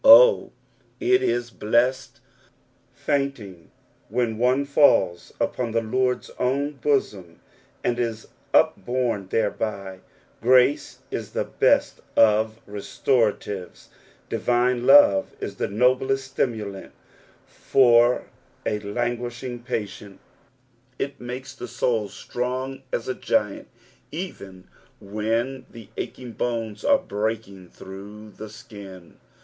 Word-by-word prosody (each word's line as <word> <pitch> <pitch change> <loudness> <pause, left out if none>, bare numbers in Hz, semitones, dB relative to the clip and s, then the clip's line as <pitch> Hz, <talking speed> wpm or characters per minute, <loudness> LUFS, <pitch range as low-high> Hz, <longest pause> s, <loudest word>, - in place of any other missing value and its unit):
Oh, - - +8 0.5
it 375 +2 +3
ie 120 +1 +1 0.2
blessed 125 +5 +1 0.7
fainting 130 - -3 0.4
when 115 0 -1
one 130 +3 +2
falls 140 - +3
upon 120 -3 -1
the 115 - +2
Lord's 125 +3 -1
own 140 +3 0
bosom, 100 - -1 0.4
and 120 0 0
is 115 -2 -2 0.2
upbonie 115 -3 +1
thereby 105 -2 -1
I 95 - -13 0.4
Grace 130 +3 +3
is - - -5
the - - 0
best - - +2
of 110 0 +4
restoratives; 105 -2 -1 0.4
divine 125 0 +1
love 135 -9 +6
is - - -5
the - - -1
noblest 130 +5 +1
stimulaot 105 -6 -2 0.6
for 120 -1 +4 0.4
a 105 - 0
languishing 120 +3 -3
patient; 105 -5 -5 0.8
it 140 0 -4
makes 125 +2 -6
the 130 - -8
soul 115 -2 0
strong 130 +5 -4
as 115 - -2
a 130 - 0
giant, - - -1 0.4
even 100 - -7 0.3
when 115 +6 -2
tho 115 -2 -11
achintf 125 -3 -7
bones 115 -3 -2
are 285 -1 +5
breaking 105 - -4
through 105 +3 -11
the 110 +1 -9
skin. 100 -5 -12
120 Hz, 105 wpm, -24 LUFS, 105-130 Hz, 0.8 s, Oh